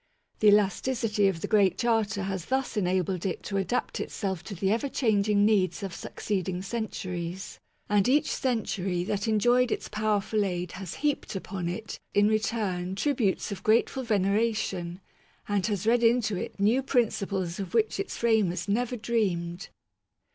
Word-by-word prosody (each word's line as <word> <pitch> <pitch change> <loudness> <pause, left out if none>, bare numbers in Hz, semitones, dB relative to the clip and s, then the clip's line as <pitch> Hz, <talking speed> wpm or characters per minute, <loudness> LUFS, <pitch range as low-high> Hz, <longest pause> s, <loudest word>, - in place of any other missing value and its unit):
The 215 - +4
elasticity 210 +1 +3
of 175 -4 -1
the - - -2
Great 200 -4 +3
Charter 220 -4 +1
has 190 -3 -3
thus 265 0 -1
enabled 185 -2 0
it 190 - -3
to 195 - -3
adapt 195 +6 -1
itself 190 -5 -3
to 200 - -6
the 190 +3 0
ever 235 +6 0
changing 210 -5 +2
needs 200 -2 +2
of 195 -3 -4
suc - - -8
ceeding 185 -3 -2
centuries; 190 -4 -4 0.3
and 205 +3 +3
each 290 +3 +4
century 195 -8 -1
that 200 +3 -2
enjoyed 240 +3 +3
its - - -3
powerful 215 0 0
aid 180 -2 -2
has 185 -1 -7
heaped 290 -7 0
upon 185 -2 -4
it, 220 +5 -5 0.2
in 205 0 +5
return, 210 -4 -1
tributes 225 -4 0
of 200 - -5
grateful 230 +4 +2
veneration, 200 -4 0 0.5
and 205 -2 +1
has 205 -3 -2
read 235 +1 +4
into 230 -3 +3
it 180 - -5
new 220 +6 +3
prin 245 -4 +2
ciples 190 -2 -3
of 195 +2 -5
which 220 -3 +2
its 195 - -3
framers 205 -6 +1
never 245 +4 0
dreamed. 195 -5 -1
205 Hz, 160 wpm, -28 LUFS, 190-225 Hz, 0.5 s, in